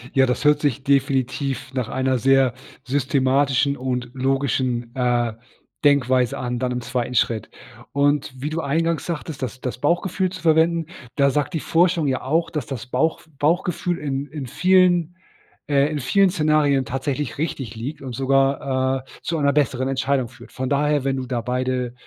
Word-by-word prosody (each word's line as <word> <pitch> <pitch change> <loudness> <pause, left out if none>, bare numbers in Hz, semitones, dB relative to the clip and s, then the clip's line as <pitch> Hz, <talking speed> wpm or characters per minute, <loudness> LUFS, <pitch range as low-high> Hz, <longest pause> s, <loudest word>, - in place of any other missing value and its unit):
Ja, 135 -1 +5
das 125 +3 -2
hört 150 0 +4
sich 140 -2 0
definitiv 135 0 0
nach 125 -4 -2
einer 130 0 0
sehr 135 0 +3 0.3
systematischen 135 +1 +2
und 125 -2 -3
logischen, 130 -3 -1
äh, 120 -3 +1 0.5
Denkweise 130 -4 +3
an, 125 -1 -3
dann 125 0 -1
im 125 - -2
2. 125 0 -3
Schritt. 110 -3 +1 0.4
Und 145 -1 +1
wie 150 - -2
du 165 +1 -2
eingangs 165 +3 0
sagtest, 160 -4 -5
das 130 +1 -5
das 125 -1 -4
Bauchgefühl 180 +5 +1
zu 185 -2 -8
verwenden, 165 0 +3 0.3
da 140 -1 +4
sagt 145 +4 -1
die 160 - 0
Forschung 165 -1 +2
ja 130 -2 0
auch, 160 +6 0
dass 150 -6 -3
das 130 +1 -6
Bauchf 155 +5 -1
Bauchgefühl 175 +2 0
in 140 -1 -3
in 140 -2 -6
vielen 180 +1 +3 0.5
äh, 140 +1 +2
in 150 - -2
vielen 195 +9 +3
Szenarien 150 -5 +2
tatsächlich 135 +2 -3
richtig 135 -8 -3
liegt 135 +7 -6
und 130 -2 -6
sogar, 135 0 +1
äh, - - -23
zu 165 - -1
einer 140 -1 +3
besseren 130 -3 +1
Entscheidung 130 -1 0
führt. 120 -1 -15
Von 130 0 -3
daher, 145 0 +1
wenn 135 0 0
du 130 - -3
da 125 -2 -2
beide 125 0 -2
135 Hz, 170 wpm, -22 LUFS, 130-150 Hz, 0.5 s, Ja